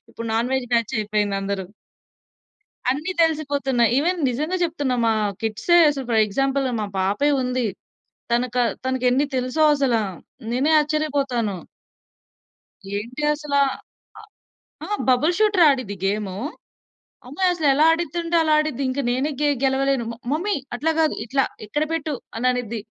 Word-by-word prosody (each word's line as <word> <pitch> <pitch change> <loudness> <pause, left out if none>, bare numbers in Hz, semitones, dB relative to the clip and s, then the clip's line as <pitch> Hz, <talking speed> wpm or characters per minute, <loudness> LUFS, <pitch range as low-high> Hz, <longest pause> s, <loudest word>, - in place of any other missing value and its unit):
ఇప్పుడు 230 - -7
non 235 +3 0
veg 265 -2 -1
batch 230 0 +1
అయిపోయింది 210 -1 -1
అందరు. 195 -1 -3 1.3
అన్ని 300 +8 -1
తెలిసిపోతున్నాయి. 280 -6 +1
ఈవెన్ 345 +5 +1
నిజంగా 305 +9 -2
జెప్తున్నా 290 -6 -1
మా 225 - +3 0.3
కిడ్సే 225 +11 +2
అసలు 270 -3 -5
ఫర్ 225 -2 +4
ఎగ్జాంపుల్ 270 +5 0 0.2
మా 210 - -1
పాపే 205 +10 +1
ఉంది. 250 -1 -1 0.7
తనక 245 +1 0 0.3
తనకెన్ని 260 +1 +1
తెలుసో 255 +5 0
అసల. 270 -4 +1 0.6
నేనే 265 +6 +1
ఆశ్చర్యపోతాను. 280 -8 -1 1.4
ఏంటి 235 +7 -5
అసల. 295 -1 -4 0.6
అ - - -10 0.7
ఆ! - - -11 0.2
Bubble 285 +7 +3
shooter 415 -5 +4
ఆడిద్ది 255 -7 -2
game. 200 -1 -1 0.9
అమ్మాయి 365 +8 +1
అసలు 320 -4 0
ఎలా 300 +3 +4
అడిదంటే 340 +1 -2
అలా 315 -1 +2
ఆడిద్ది. 305 -3 -2
ఇంకా 265 +2 -1
నేనే 265 +5 0
గే 295 - +3 0.2
గెలవలేను. 270 -1 +1
మ - - -6 0.2
మమ్మీ 360 +8 0 0.2
అట్లా 320 +6 0
గాదు 315 -1 +2
ఇట్లా 270 +3 +1 0.2
ఇక్కడ 295 +9 -1
పెట్టు 310 -2 -2 0.2
అని 245 +3 0
అనిద్ది. 235 -2 -3
270 Hz, 135 wpm, -22 LUFS, 235-305 Hz, 1.4 s, ఫర్